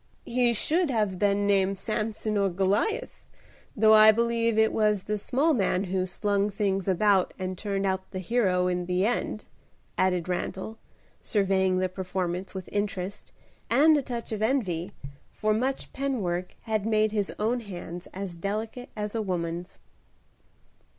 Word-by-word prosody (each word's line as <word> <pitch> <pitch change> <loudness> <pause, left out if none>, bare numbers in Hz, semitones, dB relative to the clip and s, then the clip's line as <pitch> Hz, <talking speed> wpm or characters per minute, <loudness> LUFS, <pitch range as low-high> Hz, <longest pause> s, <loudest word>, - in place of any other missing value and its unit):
"He 245 0 +2
should 320 - +1
have 210 -7 0
been 205 0 +2
named 195 -1 +2
Samson 215 +1 -2
or 200 -1 +2
Goliath; 200 - -1 0.5
though 220 +1 +5
I 215 0 +9
believe 230 0 +1
it 220 0 +4
was 210 -3 +2
the 210 - -2
small 280 +10 +1
man 195 -5 +1
who 185 -1 -1
slung 200 +2 0
things 195 -2 -1
about 195 0 +3
and 185 0 -3
turned 195 +1 -2
out 190 0 -1
the - - -6
hero 185 -2 +1
in 180 -1 -1
the 180 +2 +1
end," 220 -2 -2 0.5
added 180 -2 +1
Randal, 190 +4 -4 0.4
surveying 190 -2 +1
the 185 0 +1
performance 185 0 -4
with 190 -1 -6
interest 200 -2 -3 0.4
and 310 +2 +6
a 290 - +2
touch 240 -3 -6
of 215 -1 -3
envy, 205 -7 0 0.4
for 215 0 0
much 260 +5 -2
pen 270 -3 -1
work 175 +1 -3
had 220 -3 -1
made 215 0 +2
his 205 -3 -1
own 230 +4 0
hands 180 -5 -8
as 190 -2 -6
delicate 215 +7 -4
as 210 -1 -4
a 225 - -1
woman's. 175 -2 -3
205 Hz, 155 wpm, -27 LUFS, 185-220 Hz, 0.5 s, I